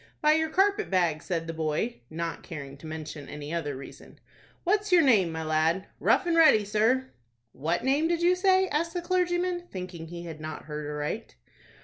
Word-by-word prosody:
"By 300 - +4
your 320 0 +1
carpet 405 +4 +2
bag," 170 -5 +1
said 170 -3 -2
the 165 - -5
boy, 160 - -2
not 165 +1 -4
caring 140 -5 -8
to 155 - -10
mention 155 -2 -7
any 150 +1 -6
other 145 -5 -2
reason. 140 - -12 0.4
"What's 415 +2 +1
your 350 -2 +7
name, 205 - +4
my 160 0 -4
lad?" 160 +4 +1
"Rough - - +3
and 340 -1 +1
Ready, 310 -11 +6
sir." 225 +6 +1 0.4
"What 165 +6 -2
name 280 +5 +2
did 340 0 0
you 355 +1 +5
say?" 375 0 +3
asked 335 +4 -1
the 350 - -2
clergyman, 350 -1 0
thinking 180 -3 -7
he 170 +1 -7
had 160 -3 -8
not 155 0 -6
heard 150 -1 -5
aright. 150 - -4
185 Hz, 190 wpm, -28 LUFS, -, 0.4 s, your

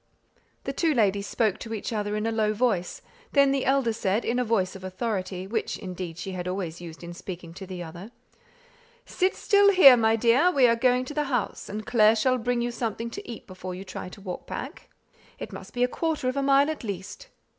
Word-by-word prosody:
The - - -3
two 320 -4 +1
ladies 200 -3 +2
spoke 215 -5 0
to 225 -1 -5
each 220 - -4
other 210 -1 -2
in 210 +1 -2
a 225 - 0
low 215 -1 +1
voice; 210 -6 -1 0.3
then 280 -1 +5
the 275 -1 0
elder 265 -4 +2
said 210 0 -1
in 245 +2 0
a - - +2
voice 210 -6 0
of 190 - -10
authority, 185 -1 -3
which, 220 +3 -2
indeed, 180 -3 -6
she 190 +2 -5
had 180 -1 -5
always 180 -3 -4
used 165 -1 -10
in 170 0 -7
speaking 175 -1 -8
to 190 +2 -9
the 180 -1 -6
other, 170 +5 -9 1.0
"Sit 375 -4 0
still 405 0 +4
here, 365 -10 +9
my 225 -1 +3
dear; 240 +9 +4
we 275 -8 +4
are 230 -1 +5
going 250 +1 +2
to 295 - -7
the 300 0 0
house, 245 -7 -2
and 215 +1 -5
Clare 225 -2 +5
shall 255 +3 +2
bring 240 +1 0
you 240 - -1
something 230 0 -3
to 405 - -8
eat 230 - -8
before 185 -1 -7
you 185 - -7
try 185 -1 -7
to 200 - -13
walk 185 -2 -7
back; - - -7 0.5
it - - -7
must - - -9
be 245 - 0
a - - +4
quarter 310 -1 -2
of 255 - 0
a 280 - 0
mile 275 +2 +4
at 310 - -7
least." 200 - -6
225 Hz, 225 wpm, -26 LUFS, 190-255 Hz, 1.0 s, here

